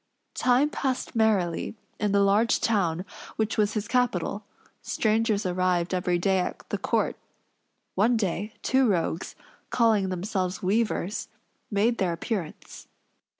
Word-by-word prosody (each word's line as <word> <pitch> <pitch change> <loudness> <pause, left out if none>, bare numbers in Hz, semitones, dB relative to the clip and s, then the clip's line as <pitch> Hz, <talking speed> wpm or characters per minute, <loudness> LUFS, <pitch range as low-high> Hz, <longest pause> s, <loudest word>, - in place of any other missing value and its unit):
Time 255 +4 +3
passed 260 -4 -2
merrily 210 -6 +1 0.2
in 210 -1 +1
the 200 0 +4
large 210 +4 +3
town 185 -5 +1 0.3
which 220 0 -1
was 210 -1 +2
his 210 -1 -2
capital; 215 -5 0 0.4
strangers 220 -1 +1
arrived 180 -1 +1
every 180 -1 +1
day 190 +2 +2
at 180 - -4
the - - -2
court. - - 0 0.8
One 230 +5 +3
day, 205 +1 -2
two 265 -1 +3
rogues, 170 -2 -1 0.3
calling 220 -5 +3
themselves 185 0 -2
weavers, 205 -1 0 0.4
made 225 +3 +1
their 180 -3 +1
appearance. 170 -1 -5
205 Hz, 125 wpm, -26 LUFS, 185-225 Hz, 0.8 s, the